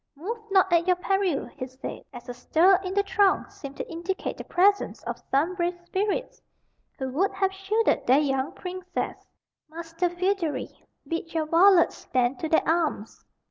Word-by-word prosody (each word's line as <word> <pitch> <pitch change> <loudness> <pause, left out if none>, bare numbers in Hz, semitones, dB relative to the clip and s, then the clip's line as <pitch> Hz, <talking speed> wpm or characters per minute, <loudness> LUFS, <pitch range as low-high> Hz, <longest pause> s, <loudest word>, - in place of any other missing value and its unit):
"Move 410 +11 -5
not 380 -2 +3
at 340 +1 +3
your 365 - +4
peril," 370 -4 0
he 255 -3 -7
said, 260 +1 -8
as 245 0 -11
a 245 - -5
stir 330 +9 +4
in 370 - -4
the 405 - +3
throng 395 -1 +2
seemed 280 -1 -10
to - - -5
indicate 345 +3 -4
the - - -8
presence 400 +3 +1
of - - -5
some 300 +7 +1
brave 350 -1 -2
spirits 410 +7 -2 0.6
who 265 - -3
would 370 +9 +1
have 385 -1 0
shielded 405 +4 0
their 255 +3 +6
young 270 -2 0
princess. 365 -1 -5 0.4
"Master 330 +2 -3
Feodary, 355 -2 -1 0.4
bid 330 0 -4
your 320 -1 +1
varlets 345 +3 +5
stand 250 0 -1
to 320 - -3
their 320 - +2
arms." 320 -10 -1
345 Hz, 170 wpm, -26 LUFS, 300-385 Hz, 0.6 s, their